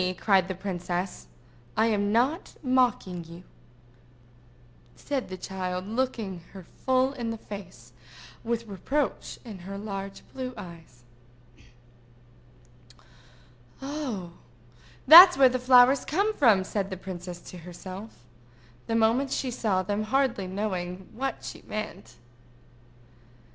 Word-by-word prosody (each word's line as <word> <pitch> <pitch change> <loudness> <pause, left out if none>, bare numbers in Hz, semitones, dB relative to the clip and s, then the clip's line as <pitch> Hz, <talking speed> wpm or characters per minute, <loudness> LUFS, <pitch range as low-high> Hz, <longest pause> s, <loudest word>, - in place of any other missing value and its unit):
cried 195 -3 +3
the 190 - -4
princess. 180 -1 -4 0.5
"I 220 - +4
am 205 -2 +1
not 260 - 0
mocking 250 -9 +1
you," 170 +2 -12 1.5
said 275 -6 -3
the 185 - -6
child, 185 0 -4
looking 225 -5 -2
her 190 -2 -9
full 260 +8 0
in 240 -4 -4
the 225 - -3
face, 185 - -10 0.5
with 230 0 -2
reproach 265 +8 -2
in 210 -5 -8
her 195 +3 -7
large 195 -1 -6
blue 255 -1 -5
eyes. 165 -10 -12 2.8
"Oh, 270 - -5 0.8
that's 355 +3 +11
where 265 -1 +7
the 255 0 -1
flowers 250 +1 +6
come 400 +8 0
from!" 225 - +4
said 195 0 -3
the 190 - -5
princess 180 -1 -7
to 180 - -9
herself, 185 - -10 0.6
the 225 - -1
moment 230 +5 +2
she 260 - -1
saw 205 -6 0
them, 205 +3 -2
hardly 240 -5 0
knowing 185 -2 -4
what 265 +4 -4
she - - -8
meant. 120 - -6
205 Hz, 115 wpm, -27 LUFS, 185-255 Hz, 2.8 s, that's